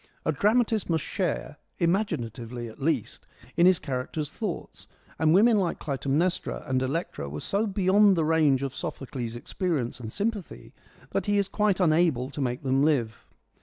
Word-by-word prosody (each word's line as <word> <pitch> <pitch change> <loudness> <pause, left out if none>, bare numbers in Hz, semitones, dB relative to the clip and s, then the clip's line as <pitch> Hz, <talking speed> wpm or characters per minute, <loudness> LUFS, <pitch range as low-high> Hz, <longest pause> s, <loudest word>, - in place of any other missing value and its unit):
A - - +2
dramatist 215 - +2
must 160 -3 +1
share 175 -6 -2
— - - -45
imaginatively 125 - -1
at 110 +5 -12
least 135 -7 -1
— 125 - -21
in 170 +1 +5
his 185 -1 +5
characters' 140 +2 -4
thoughts; 210 -7 -6 0.3
and 155 0 +4
women 215 +6 +5
like 185 -4 0
Clytemnestra 145 +5 -1
and 130 -2 0
Electra 130 - -3
were 75 +2 -5
so 205 - -1
beyond 195 +1 +4
the 160 - +2
range 150 -4 +3
of 135 -2 -3
Sophocles' 120 -3 -5
experience 130 - -2
and 110 -2 -6
sympathy 205 - -4 0.4
that - - -1
he 205 0 +2
is 200 -1 +2
quite 210 -2 +1
unable 155 -6 +2
to 145 - -5
make 125 0 -2
them 135 0 +2
live. 130 -7 0
155 Hz, 165 wpm, -27 LUFS, 130-190 Hz, 0.4 s, in